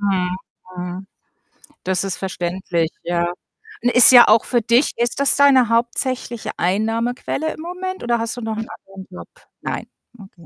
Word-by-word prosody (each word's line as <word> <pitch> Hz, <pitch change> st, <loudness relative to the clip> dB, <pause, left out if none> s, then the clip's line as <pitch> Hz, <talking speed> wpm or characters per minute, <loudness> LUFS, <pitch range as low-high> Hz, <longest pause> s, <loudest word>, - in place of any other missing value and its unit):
Mhm, 185 Hz, -3 st, -1 dB, 0.4 s
mhm. 180 Hz, +2 st, -6 dB, 0.8 s
Das 190 Hz, +1 st, -1 dB
ist 195 Hz, -2 st, -4 dB
verständlich, 175 Hz, -2 st, -3 dB
ja. 175 Hz, 0 st, -1 dB, 0.5 s
Und 245 Hz, -, +3 dB
ist 250 Hz, -, +9 dB
ja 245 Hz, -2 st, +8 dB
auch 220 Hz, +1 st, +4 dB
für 240 Hz, -2 st, 0 dB
dich 235 Hz, +5 st, +2 dB
ist 240 Hz, +2 st, -1 dB
das 280 Hz, -1 st, +3 dB
deine 270 Hz, -4 st, +4 dB
hauptsächliche 240 Hz, 0 st, -2 dB
Einnahmequelle 230 Hz, -, -2 dB
im -, -, -11 dB
Moment 365 Hz, +1 st, -6 dB
oder 240 Hz, 0 st, 0 dB
hast 230 Hz, +1 st, -3 dB
du 245 Hz, -, -6 dB
noch 220 Hz, -1 st, -4 dB
'n 220 Hz, +1 st, -5 dB
anderen 195 Hz, -1 st, -12 dB
Job? 180 Hz, -, -10 dB, 0.3 s
Nein, -, -, -5 dB, 0.3 s
okay. 190 Hz, -4 st, -16 dB
225 Hz, 160 wpm, -19 LUFS, 185-245 Hz, 0.8 s, ist